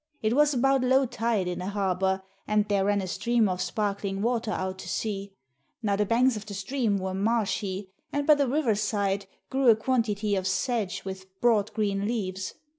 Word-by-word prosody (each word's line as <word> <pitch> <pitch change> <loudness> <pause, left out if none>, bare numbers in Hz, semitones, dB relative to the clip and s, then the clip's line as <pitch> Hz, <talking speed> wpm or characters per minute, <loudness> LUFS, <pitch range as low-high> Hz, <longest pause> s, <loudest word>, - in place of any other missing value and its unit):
It 215 +1 +2
was 295 +1 +5
about 270 0 +2
low 260 +2 +4
tide 230 -5 -1
in 180 - -3
the 180 - -4
harbour, 190 -1 0 0.2
and 210 0 +2
there 200 -2 +1
ran 205 0 +2
a - - -4
stream 235 +3 +1
of 185 -1 -2
sparkling 200 -2 -2
water 230 -1 0
out 190 -2 -3
to 180 - -7
sea. 200 0 -3 0.5
Now 205 -2 +2
the 210 0 0
banks 245 +3 +3
of 210 0 -7
the 200 - -6
stream 225 0 0
were 190 0 -3
marshy, 200 -2 -1 0.2
and 285 0 -1
by 305 - +7
the 285 -2 +2
river 265 -3 +2
side 200 -1 -1 0.2
grew 265 -2 +3
a 225 - +8
quantity 215 -3 0
of 190 -1 -1
sedge 195 -1 -1
with 190 0 -6
broad, 220 -4 +3
green 205 -2 0
leaves. 190 -5 -3
205 Hz, 190 wpm, -27 LUFS, 195-235 Hz, 0.5 s, a